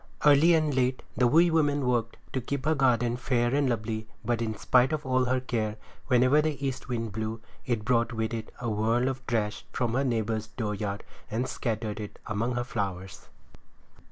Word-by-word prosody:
Early 150 Hz, +4 st, +7 dB
and 155 Hz, -2 st, +1 dB
late 130 Hz, 0 st, +1 dB
the 125 Hz, +1 st, +4 dB
wee 165 Hz, +7 st, +5 dB
woman 145 Hz, -4 st, +2 dB
worked 120 Hz, -2 st, 0 dB, 0.2 s
to 130 Hz, -, 0 dB
keep 140 Hz, +3 st, -4 dB
her 155 Hz, -, +3 dB
garden 120 Hz, -4 st, +2 dB
fair 120 Hz, -1 st, +1 dB
and 140 Hz, -2 st, +2 dB
lovely 110 Hz, -1 st, -2 dB, 0.2 s
but 120 Hz, 0 st, 0 dB
in 110 Hz, -2 st, -2 dB
spite 125 Hz, +2 st, +3 dB
of 155 Hz, -2 st, -2 dB
all 130 Hz, 0 st, +2 dB
her 130 Hz, +1 st, +1 dB
care 110 Hz, -4 st, -2 dB, 0.3 s
whenever 130 Hz, +3 st, +5 dB
the 150 Hz, -2 st, -2 dB
east 135 Hz, 0 st, -4 dB
wind 115 Hz, -3 st, -2 dB
blew 110 Hz, +2 st, -3 dB, 0.3 s
it 115 Hz, -4 st, -1 dB
brought 120 Hz, 0 st, +2 dB
with 110 Hz, -1 st, -2 dB
it 110 Hz, -1 st, -5 dB
a 125 Hz, -, -3 dB
whirl 115 Hz, +3 st, +1 dB
of 130 Hz, 0 st, -3 dB
trash 110 Hz, -3 st, -1 dB
from 120 Hz, -3 st, -1 dB
her 135 Hz, +3 st, +2 dB
neighbor's 110 Hz, -3 st, -1 dB
dooryard, 105 Hz, -2 st, -3 dB, 0.3 s
and 115 Hz, +4 st, -1 dB
scattered 110 Hz, -3 st, -3 dB
it 105 Hz, -1 st, -7 dB
among 115 Hz, +4 st, -1 dB
her 120 Hz, -, 0 dB
flowers. 95 Hz, -6 st, -4 dB
120 Hz, 185 wpm, -28 LUFS, 110-130 Hz, 0.3 s, Early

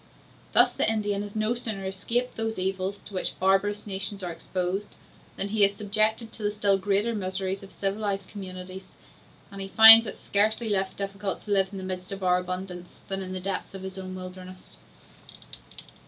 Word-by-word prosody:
Thus -, -, +6 dB
the -, -, +1 dB
Indian 205 Hz, -2 st, -1 dB
has 205 Hz, 0 st, -8 dB
no 215 Hz, +2 st, +1 dB
sooner 220 Hz, -5 st, -4 dB
escaped 230 Hz, +6 st, -2 dB
those 225 Hz, 0 st, -2 dB
evils 190 Hz, +1 st, -2 dB
to -, -, -11 dB
which 185 Hz, -, -3 dB
barbarous 195 Hz, +2 st, +1 dB
nations 195 Hz, 0 st, -1 dB
are 175 Hz, -, -3 dB
exposed, 185 Hz, +4 st, -4 dB, 0.4 s
than 200 Hz, -, -2 dB
he 210 Hz, 0 st, +2 dB
is 200 Hz, 0 st, +3 dB
subjected 215 Hz, +2 st, 0 dB
to -, -, -12 dB
the 205 Hz, -, +1 dB
still 205 Hz, -2 st, +1 dB
greater 205 Hz, +4 st, +1 dB
miseries 190 Hz, -1 st, -2 dB
of 195 Hz, -1 st, -12 dB
civilized 195 Hz, -1 st, -2 dB
communities; 185 Hz, -1 st, -9 dB, 0.6 s
and 200 Hz, 0 st, -7 dB
he 195 Hz, -, -5 dB
finds 225 Hz, +2 st, +10 dB
is -, -, -6 dB
scarcely 220 Hz, +3 st, +1 dB
less 195 Hz, -2 st, +1 dB
difficult 195 Hz, 0 st, -4 dB
to 210 Hz, -, -8 dB
live 195 Hz, -1 st, +3 dB
in 200 Hz, -, -7 dB
the 190 Hz, -, -6 dB
midst 185 Hz, 0 st, -5 dB
of 195 Hz, -1 st, -6 dB
our 180 Hz, 0 st, +3 dB
abundance, 180 Hz, -1 st, -7 dB
than 195 Hz, 0 st, -2 dB
in 185 Hz, -1 st, -6 dB
the 185 Hz, -, -4 dB
depth 195 Hz, +1 st, -4 dB
of 190 Hz, -, -8 dB
his 190 Hz, 0 st, -7 dB
own 185 Hz, -1 st, -7 dB
wilderness. 185 Hz, 0 st, -10 dB
195 Hz, 185 wpm, -26 LUFS, 185-205 Hz, 0.6 s, finds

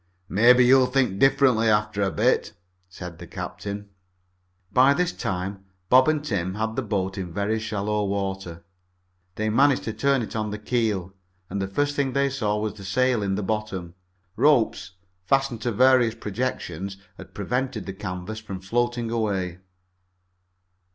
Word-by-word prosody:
"Maybe 125 Hz, +5 st, +6 dB
you'll 130 Hz, 0 st, +6 dB
think 125 Hz, -7 st, +1 dB
differently 135 Hz, -5 st, +4 dB
after 105 Hz, -1 st, +1 dB
a 100 Hz, -, +2 dB
bit," -, -, +1 dB, 0.4 s
said 90 Hz, -2 st, -9 dB
the 90 Hz, -, -9 dB
captain. 100 Hz, +3 st, -6 dB, 0.8 s
By 135 Hz, +4 st, +5 dB
this 180 Hz, +2 st, +1 dB
time 95 Hz, +1 st, -4 dB, 0.3 s
Bob 130 Hz, +2 st, +6 dB
and 155 Hz, -1 st, +1 dB
Tim 95 Hz, -, -2 dB
had 110 Hz, +1 st, -2 dB
the 135 Hz, -, 0 dB
boat 95 Hz, -4 st, -2 dB
in 90 Hz, -2 st, -5 dB
very 100 Hz, +4 st, -1 dB
shallow 105 Hz, -1 st, -1 dB
water. 95 Hz, -4 st, -3 dB, 0.7 s
They 110 Hz, 0 st, -1 dB
managed 135 Hz, +3 st, +3 dB
to 110 Hz, -, -3 dB
turn 140 Hz, -1 st, +1 dB
it 110 Hz, -, -7 dB
on 110 Hz, -1 st, -1 dB
the 105 Hz, -, -4 dB
keel, 105 Hz, -5 st, -1 dB, 0.4 s
and 100 Hz, +1 st, -2 dB
the 95 Hz, -, -1 dB
first 145 Hz, +8 st, -1 dB
thing 140 Hz, -3 st, 0 dB
they 140 Hz, 0 st, +1 dB
saw 105 Hz, -6 st, -1 dB
was 105 Hz, -1 st, -2 dB
the 100 Hz, -2 st, -12 dB
sail 125 Hz, +4 st, +1 dB
in 100 Hz, -1 st, 0 dB
the 105 Hz, -, -2 dB
bottom. 95 Hz, -4 st, -3 dB, 0.4 s
Ropes, 125 Hz, -6 st, +2 dB, 0.3 s
fastened 135 Hz, +2 st, +1 dB
to 120 Hz, -, -1 dB
various 125 Hz, 0 st, +4 dB
projections, 100 Hz, -5 st, -4 dB, 0.2 s
had -, -, -12 dB
prevented 125 Hz, +3 st, -2 dB
the 95 Hz, -, -5 dB
canvas 95 Hz, +2 st, -6 dB
from 100 Hz, -4 st, -7 dB
floating 120 Hz, +4 st, -1 dB
away. 95 Hz, -6 st, -1 dB
110 Hz, 160 wpm, -25 LUFS, 95-125 Hz, 0.8 s, Maybe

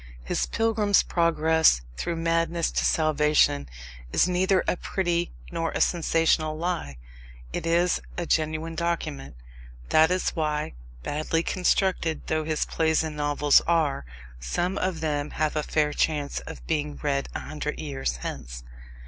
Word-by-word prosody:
His -, -, -1 dB
pilgrim's 220 Hz, -3 st, +2 dB
progress 160 Hz, -, +3 dB
through 170 Hz, -, -3 dB
madness 165 Hz, 0 st, 0 dB
to -, -, 0 dB
salvation 150 Hz, -, +2 dB, 0.4 s
is -, -, +3 dB
neither 185 Hz, +1 st, +2 dB
a -, -, +2 dB
pretty 175 Hz, -1 st, -1 dB, 0.2 s
nor 165 Hz, -1 st, -1 dB
a -, -, -2 dB
sensational 165 Hz, -2 st, +2 dB
lie. 165 Hz, -, -3 dB, 0.6 s
It -, -, -3 dB
is 170 Hz, +1 st, +2 dB, 0.2 s
a 175 Hz, -, -2 dB
genuine 155 Hz, +1 st, 0 dB
document. 160 Hz, -, -3 dB, 0.5 s
That 160 Hz, +1 st, +5 dB
is 185 Hz, 0 st, 0 dB
why, 150 Hz, -, -2 dB, 0.3 s
badly 155 Hz, +2 st, -1 dB
constructed 180 Hz, -3 st, 0 dB
though 155 Hz, 0 st, -1 dB
his 155 Hz, -1 st, 0 dB
plays 160 Hz, 0 st, +1 dB
and 155 Hz, -1 st, -4 dB
novels 145 Hz, -1 st, +3 dB
are, 160 Hz, -, +1 dB, 0.4 s
some 175 Hz, -, -1 dB
of 185 Hz, -4 st, -2 dB
them 150 Hz, -2 st, -1 dB
have 155 Hz, -1 st, 0 dB
a 155 Hz, -, +1 dB
fair 150 Hz, 0 st, 0 dB
chance 145 Hz, -2 st, 0 dB
of -, -, -9 dB
being 150 Hz, -2 st, -2 dB
read 140 Hz, -2 st, 0 dB
a -, -, -1 dB
hundred 150 Hz, 0 st, -5 dB
years 135 Hz, -, -3 dB
hence. -, -, -6 dB
160 Hz, 140 wpm, -26 LUFS, 150-170 Hz, 0.6 s, That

